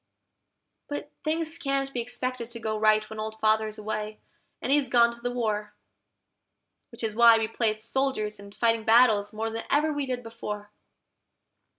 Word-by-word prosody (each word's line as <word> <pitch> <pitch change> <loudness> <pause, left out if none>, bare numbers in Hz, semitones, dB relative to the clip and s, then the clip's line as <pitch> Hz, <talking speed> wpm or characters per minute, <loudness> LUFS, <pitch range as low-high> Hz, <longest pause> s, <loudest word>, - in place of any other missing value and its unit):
But 290 0 -5
things 320 +1 -1
can't 275 -1 -1
be 240 - -1
expected 245 0 -4
to 235 -1 -7
go 220 -1 -2
right 215 0 +3
when 220 - -8
Old 220 0 -5
Father's 215 0 +1
away, 215 0 -4 0.4
and - - -2
he's 285 -3 +3
gone 235 -1 +5
to 235 - -14
the 245 - -1
war; 215 -4 -2 1.1
Which 235 -1 -7
is 220 -1 -1
why 230 0 +7
we 225 -1 0
play 225 0 0
at 215 0 -4
soldiers 230 -4 -1
and 200 0 -12
fighting 230 -1 +2
battles 220 -3 +5
more 225 +1 -3
than 225 0 -5
ever 305 +2 +2
we 290 -2 -2
did 250 -1 -3
before. 210 -2 -7
230 Hz, 175 wpm, -27 LUFS, 215-255 Hz, 1.1 s, why